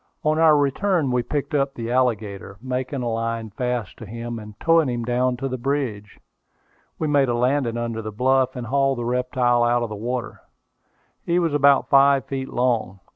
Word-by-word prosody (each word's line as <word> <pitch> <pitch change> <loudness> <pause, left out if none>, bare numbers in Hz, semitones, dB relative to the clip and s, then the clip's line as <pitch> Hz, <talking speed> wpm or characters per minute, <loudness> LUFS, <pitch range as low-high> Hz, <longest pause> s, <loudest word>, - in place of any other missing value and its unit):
On 155 +1 +1
our 160 -2 +6
return 145 +1 +1
we 125 0 +2
picked 145 +4 -4
up 140 -1 0
the 115 0 -4
alligator, 105 -6 -1
making 130 +2 -3
a - - -2
line 115 -1 -3
fast 125 -2 -3
to 110 - -9
him, 115 +2 -6
and 105 -1 -12
towing 165 -4 +3
him 120 -1 -3
down 125 +1 0
to 135 +2 -3
the 130 -1 -4
bridge. 120 -6 -3 0.8
We 155 - -2
made 140 -3 +3
a 120 - +1
landing 125 -1 +1
under 115 -1 -3
the 110 0 -6
bluff, 130 +4 +1
and 125 -2 -5
hauled 135 +2 +1
the 120 - -3
reptile 125 0 +1
out 120 0 +2
of 115 - -3
the 105 - -5
water. 120 +3 -4 0.8
He 170 - 0
was 165 -4 +1
about 140 -1 +4
five 140 -1 +5
feet 135 -1 -4
long. 115 -6 -1
125 Hz, 190 wpm, -23 LUFS, 115-140 Hz, 0.8 s, our